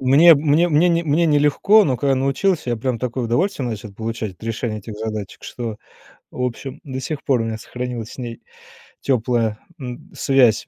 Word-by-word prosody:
Мне 145 +6 +7
мне 155 +4 +3
мне 160 +3 +4
не 170 0 +2
мне 165 +2 +2
не 150 -2 +4
легко, 200 +9 +5
но 130 -4 +1
когда 140 0 +1
научился, 135 +3 0
я 120 - 0
прям 120 0 -2
такое 125 0 -2
удовольствие 130 - 0
начал 105 -2 -6
получать 110 -2 -4
от - - -29
решения 115 -1 -2
этих 105 +1 -8
задачек, 110 -2 -5
что, 115 -3 -5 0.6
в 125 - -4
общем, 125 +2 -4
до 130 -2 -5
сих 145 +2 -4
пор 125 -4 +2
у - - -2
меня 110 -1 -3
сохранилась 125 -1 -5
с - - -12
ней 120 -2 -6 0.6
теплая, 115 -4 0 0.2
м, 125 -2 -8
связь. 130 -5 +3
125 Hz, 190 wpm, -21 LUFS, 115-145 Hz, 0.6 s, Мне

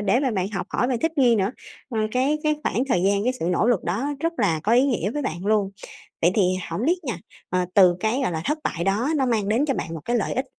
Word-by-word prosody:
để 225 +5 +2
mà 270 - +1
bạn 190 -4 -1
học 195 -3 -4
hỏi 245 - 0
và 255 - +1
thích 325 0 0
nghi 245 -4 +5
nữa. 195 0 +1 0.4
Ờ, 235 -5 -3
cái 270 +4 +1
cái 305 -1 +1
khoảng 250 -1 0
thời 180 -9 +2
gian, 200 +1 +2
cái 250 - +2
sự - - -2
nỗ 180 +4 +2
lực 240 -6 +2
đó 215 +11 -1
rất 330 +1 0
là 170 -8 +1
có 215 - +1
ý 245 +2 +6
nghĩa 220 -7 0
với 295 +5 -3
bạn 185 -7 -4
luôn. 210 -2 +2 0.5
Vậy 170 - +5
thì 210 - +3 0.3
hổng 200 +9 -2
biết 350 +3 +2
nha, 240 -9 -2 0.3
ờ, 180 0 +1
từ 180 -3 +6
cái, 220 +7 0
gọi 240 - 0
là, 160 -1 -3
thất 300 +3 0
bại 170 0 -2
đó 205 +7 +1
nó 270 -3 +1
mang 220 -5 0
đến 230 +7 +2
cho 275 - 0
bạn 165 - -4
một 160 - -6
cái 240 - 0
lợi 220 - -1
ích, 260 - -1
220 Hz, 285 wpm, -23 LUFS, 195-260 Hz, 0.5 s, ý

